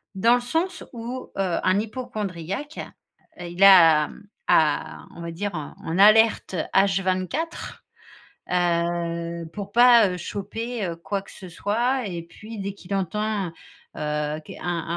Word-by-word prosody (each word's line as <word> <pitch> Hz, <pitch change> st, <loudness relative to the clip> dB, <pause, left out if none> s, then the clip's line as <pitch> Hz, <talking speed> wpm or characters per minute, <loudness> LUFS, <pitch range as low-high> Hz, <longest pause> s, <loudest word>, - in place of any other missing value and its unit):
dans 230 Hz, +5 st, +4 dB
le 245 Hz, -, -1 dB
sens 330 Hz, +9 st, -2 dB
où, 245 Hz, +2 st, -6 dB
heu, 190 Hz, -3 st, 0 dB
un 185 Hz, +2 st, +3 dB
hypocondriaque, 215 Hz, -, -5 dB, 0.6 s
heu, 175 Hz, -, -6 dB
il 175 Hz, +3 st, -1 dB
a 165 Hz, -6 st, +8 dB, 0.4 s
a 155 Hz, -2 st, +2 dB
on 170 Hz, -, -9 dB
va 170 Hz, 0 st, -5 dB
dire, 205 Hz, +5 st, -3 dB
en 160 Hz, +2 st, -5 dB
alerte 215 Hz, 0 st, +5 dB, 0.2 s
H24, 195 Hz, -, 0 dB, 0.7 s
heu, 170 Hz, -1 st, -1 dB
pour 200 Hz, 0 st, -7 dB
pas, 240 Hz, -2 st, +7 dB
heu, 180 Hz, -, -3 dB
choper, 220 Hz, +5 st, -5 dB
heu, 170 Hz, -1 st, -4 dB
quoi 195 Hz, +4 st, -3 dB
que -, -, -16 dB
ce 185 Hz, -, -11 dB
soit. 235 Hz, +7 st, 0 dB
Et 175 Hz, -3 st, -5 dB
puis, 215 Hz, +7 st, -11 dB
dès 200 Hz, +1 st, -3 dB
qu'il 200 Hz, 0 st, -6 dB
entend, 205 Hz, +1 st, -1 dB, 0.5 s
heu, 150 Hz, 0 st, -2 dB
qu -, -, -10 dB
un 170 Hz, -2 st, -3 dB
un 170 Hz, -, -1 dB
195 Hz, 145 wpm, -24 LUFS, 170-220 Hz, 0.7 s, a